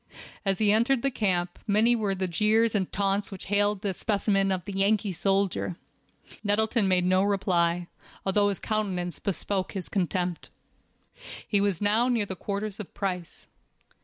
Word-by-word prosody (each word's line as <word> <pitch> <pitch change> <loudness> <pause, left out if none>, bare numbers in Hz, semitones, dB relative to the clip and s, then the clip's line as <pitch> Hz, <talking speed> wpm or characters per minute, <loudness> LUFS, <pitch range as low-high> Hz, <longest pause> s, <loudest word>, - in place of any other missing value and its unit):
As 195 -2 +1
he 210 -2 +3
entered 235 +4 +2
the 275 - +1
camp, 180 -7 0
many 220 +4 +4
were 205 -4 -1
the 190 0 -1
jeers 215 +5 +2
and 195 -4 -1
taunts 200 0 0
which 195 -2 -8
hailed 205 0 +2
this 195 -3 -2
specimen 200 -2 +1
of 185 -2 -2
the 200 - -6
Yankee 200 +1 +1
soldier. 195 -1 0 0.7
Nettleton 215 +1 +2
made 180 -1 +3
no 185 +1 +3
reply, 180 -3 +1 0.4
although 205 +1 +3
his 200 - -3
countenance 190 -5 -2
bespoke 195 -1 -2
his 190 -4 -4
contempt. 180 -2 -2 1.0
He 205 -3 +2
was 200 -2 0
now 220 +4 +3
near 235 -4 +1
the 190 - -5
quarters 200 +3 -4
of 210 - -7
Price. 180 -4 -4
200 Hz, 160 wpm, -27 LUFS, 185-210 Hz, 1.0 s, many